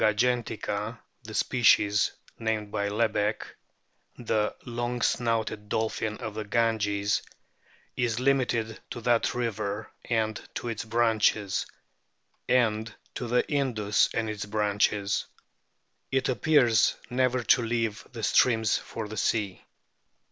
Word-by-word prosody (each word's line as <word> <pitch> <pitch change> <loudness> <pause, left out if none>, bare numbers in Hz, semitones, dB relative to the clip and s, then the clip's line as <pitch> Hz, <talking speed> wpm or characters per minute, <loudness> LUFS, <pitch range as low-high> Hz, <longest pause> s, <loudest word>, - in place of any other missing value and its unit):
Platanista 110 -1 +3 0.4
gangetica, 105 +4 -4 0.3
the 110 - -8
species 105 -4 +3 0.3
named 110 -2 -2
by 100 -1 -1
Lebeck,* 105 0 0 0.7
the 110 -3 0
"long 120 0 -3
snouted 115 -3 0
Dolphin 110 0 -1
of 110 -4 -5
the 110 0 -4
Ganges," 105 -2 +1 0.7
is 120 -1 0
limited 125 -4 +1
to 120 - -6
that 120 0 +2
river 110 -3 -3
and 110 -2 0
to 120 - -3
its 115 -1 -4
branches, 110 -3 +1 0.8
and 110 -3 +2 0.2
to 125 - -4
the 125 +1 +2
Indus 115 -7 +1
and 110 - -1
its 105 -1 -4
branches. 105 -1 +1 0.8
It 135 0 +1
appears 125 -3 +4 0.2
never 130 0 +1
to 125 - +4
leave 115 0 -1
the 115 -3 -7
streams 110 -1 +3
for 115 -2 -6
the 110 +1 -7
sea. 100 -2 0
110 Hz, 120 wpm, -28 LUFS, 105-120 Hz, 0.8 s, appears